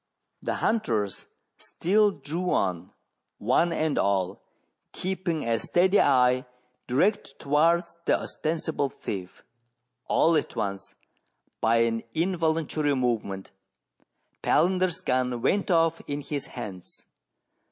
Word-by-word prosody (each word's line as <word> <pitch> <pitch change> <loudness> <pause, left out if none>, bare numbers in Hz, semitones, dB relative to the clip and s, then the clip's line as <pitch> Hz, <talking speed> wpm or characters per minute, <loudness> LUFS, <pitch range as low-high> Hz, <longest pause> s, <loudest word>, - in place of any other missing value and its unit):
The - - -2
hunters 110 - -1 0.3
still 210 +4 +2
drew 170 +1 -4
on, 90 -3 -1 0.5
one 130 +10 +2
and 155 -2 0
all 95 -1 0 0.5
keeping 180 -6 -2
a 115 -1 +1
steady 185 +3 +3
eye 125 -2 +3 0.4
direct 145 - +1
towards 170 +4 +1
the - - +3
ostensible 155 -3 -2
thief. 95 -7 -7 0.6
All 165 +1 +3
at 150 - -1
once, 100 -1 -4 0.7
by 115 +1 +3
an 115 -1 +1
involuntary 160 -4 0
movement, 110 -7 -2 0.9
Palander's 185 +1 +2
guu 125 -3 0
went 200 - +1
off 165 -2 +3
in 145 0 -3
his 145 0 -4
hands. 100 -7 -9
145 Hz, 105 wpm, -27 LUFS, 115-170 Hz, 0.9 s, steady